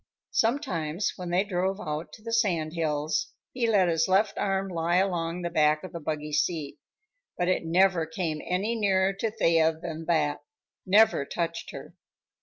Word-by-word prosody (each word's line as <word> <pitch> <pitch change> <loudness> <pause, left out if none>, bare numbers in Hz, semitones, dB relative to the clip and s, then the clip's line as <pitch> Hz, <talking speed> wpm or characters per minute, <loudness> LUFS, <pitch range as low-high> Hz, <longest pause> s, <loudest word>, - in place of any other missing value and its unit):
Sometimes, 185 - 0
when 180 -2 -6
they 180 +2 +2
drove 190 0 -1
out 155 -1 -4
to 215 - -13
the 230 0 -5
sand 175 -9 +1
hills, 155 -2 -1 0.2
he 245 -2 0
let 195 -4 +4
his 165 -1 +2
left 195 +3 +2
arm 195 0 -1
lie 170 -1 -1
along 175 -2 0
the 170 - -1
back 155 -2 +3
of 185 - -7
the 170 - -5
buggy 150 -1 -4
seat, 150 -1 -1 0.6
but 175 - 0
it 185 -2 +1
never 180 -1 +3
came 160 -2 -3
any 195 +6 -1
nearer 195 -3 +2
to 210 +3 -2
Thea 165 -7 +3
than 165 -1 -6
that, 160 -3 +1 0.5
never 205 -5 +5
touched 165 +3 -4
her. - - -9
175 Hz, 170 wpm, -27 LUFS, 160-195 Hz, 0.6 s, never